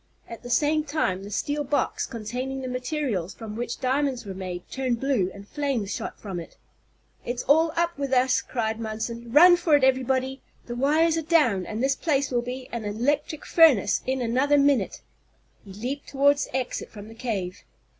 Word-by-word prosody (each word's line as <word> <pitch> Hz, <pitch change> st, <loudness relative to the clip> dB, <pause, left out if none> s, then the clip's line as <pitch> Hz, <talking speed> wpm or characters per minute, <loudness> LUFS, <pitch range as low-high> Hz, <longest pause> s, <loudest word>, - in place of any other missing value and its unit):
At 230 Hz, -, -9 dB
the 245 Hz, -, -9 dB
same 300 Hz, +4 st, +2 dB
time 285 Hz, -12 st, -1 dB
the 200 Hz, -, -8 dB
steel 290 Hz, +8 st, -2 dB
box, 285 Hz, +1 st, -1 dB
containing 250 Hz, +3 st, -4 dB
the 260 Hz, -, -4 dB
materials 250 Hz, -, -2 dB
from 220 Hz, -2 st, -8 dB
which 235 Hz, +1 st, -4 dB
diamonds 265 Hz, -1 st, 0 dB
were 195 Hz, -, -5 dB
made, 185 Hz, -2 st, -6 dB
turned 255 Hz, -3 st, -2 dB
blue, 255 Hz, -9 st, +1 dB
and 200 Hz, +1 st, -12 dB
flames 270 Hz, -8 st, -2 dB
shot -, -, -5 dB
from 190 Hz, -4 st, -5 dB
it. 165 Hz, -, -11 dB, 0.7 s
"It's 245 Hz, +1 st, -3 dB
all 320 Hz, +4 st, +4 dB
up 340 Hz, -2 st, 0 dB
with 275 Hz, -2 st, -2 dB
us!" 255 Hz, 0 st, +3 dB
cried 225 Hz, -3 st, -3 dB
Munson. 230 Hz, +1 st, -5 dB
"Run 350 Hz, +6 st, +8 dB
for 340 Hz, -4 st, +3 dB
it, 285 Hz, -, +2 dB
everybody! 260 Hz, 0 st, +1 dB, 0.2 s
The 240 Hz, -, -6 dB
wires 310 Hz, +6 st, +3 dB
are -, -, -2 dB
down, 290 Hz, -, +2 dB
and 220 Hz, +3 st, -3 dB
this 270 Hz, 0 st, +2 dB
place 285 Hz, -4 st, 0 dB
will 240 Hz, -1 st, +1 dB
be 255 Hz, +1 st, -6 dB
an 235 Hz, -2 st, -4 dB
electric 280 Hz, +9 st, -1 dB
furnace 275 Hz, -, +5 dB
in 260 Hz, -1 st, 0 dB
another 260 Hz, +5 st, +2 dB
minute!" 280 Hz, -1 st, +2 dB, 0.6 s
He 200 Hz, -, -12 dB
leaped 250 Hz, +8 st, -5 dB
toward 285 Hz, +1 st, +3 dB
the 260 Hz, -, -4 dB
exit 255 Hz, -2 st, -3 dB
from 210 Hz, -1 st, -11 dB
the 225 Hz, -, -11 dB
cave. 205 Hz, -6 st, -4 dB
255 Hz, 185 wpm, -25 LUFS, 225-285 Hz, 0.7 s, Run